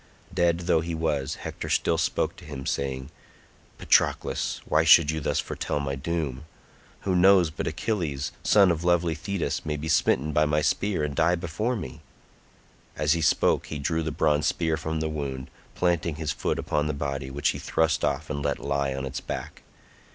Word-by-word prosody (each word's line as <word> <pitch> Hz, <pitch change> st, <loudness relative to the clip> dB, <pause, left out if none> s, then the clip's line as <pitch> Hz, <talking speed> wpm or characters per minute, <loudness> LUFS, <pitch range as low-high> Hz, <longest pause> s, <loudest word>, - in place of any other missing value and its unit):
Dead 85 Hz, 0 st, +2 dB
though 85 Hz, -2 st, +2 dB
he 85 Hz, 0 st, -4 dB
was, 75 Hz, -4 st, -1 dB
Hector -, -, -6 dB
still -, -, +1 dB
spoke -, -, 0 dB
to -, -, -13 dB
him 70 Hz, -3 st, -7 dB
saying, 65 Hz, 0 st, -3 dB, 0.7 s
"Patroclus, -, -, +1 dB
why 75 Hz, +1 st, +3 dB
should 80 Hz, -1 st, +7 dB
you 80 Hz, -, -2 dB
thus 70 Hz, -, -1 dB
foretell -, -, -3 dB
my 70 Hz, -1 st, -2 dB
doom? 75 Hz, -1 st, -3 dB, 0.6 s
Who 95 Hz, -2 st, 0 dB
knows 90 Hz, -2 st, +5 dB
but -, -, -4 dB
Achilles, 80 Hz, -, -2 dB
son 100 Hz, -4 st, +5 dB
of 85 Hz, 0 st, -2 dB
lovely 85 Hz, -1 st, +2 dB
Thetis, 90 Hz, +3 st, -3 dB
may 75 Hz, -1 st, -2 dB
be 75 Hz, +2 st, -5 dB
smitten 75 Hz, -2 st, +2 dB
by 75 Hz, +1 st, +3 dB
my 75 Hz, 0 st, +1 dB
spear 100 Hz, -6 st, 0 dB
and 75 Hz, -1 st, -2 dB
die 85 Hz, +3 st, +3 dB
before 90 Hz, +9 st, -2 dB
me?" 65 Hz, -, -7 dB, 1.0 s
As 75 Hz, +1 st, +3 dB
he 85 Hz, -, -1 dB
spoke -, -, +2 dB
he 75 Hz, -, -5 dB
drew 80 Hz, +3 st, -1 dB
the 80 Hz, -, -2 dB
bronze 75 Hz, 0 st, +2 dB
spear 80 Hz, 0 st, 0 dB
from 80 Hz, 0 st, -3 dB
the 80 Hz, -, 0 dB
wound, 70 Hz, -4 st, -5 dB, 0.2 s
planting 85 Hz, -3 st, 0 dB
his 75 Hz, -1 st, -2 dB
foot -, -, -2 dB
upon 75 Hz, 0 st, -1 dB
the 75 Hz, -, -1 dB
body, 70 Hz, -1 st, -3 dB
which 70 Hz, +2 st, 0 dB
he -, -, -2 dB
thrust 80 Hz, -2 st, 0 dB
off 75 Hz, +4 st, 0 dB
and 70 Hz, -1 st, -3 dB
let 70 Hz, -1 st, 0 dB
lie 70 Hz, -1 st, -1 dB
on 65 Hz, 0 st, -3 dB
its 65 Hz, +1 st, -5 dB
back. -, -, -6 dB
75 Hz, 190 wpm, -26 LUFS, 70-85 Hz, 1.0 s, should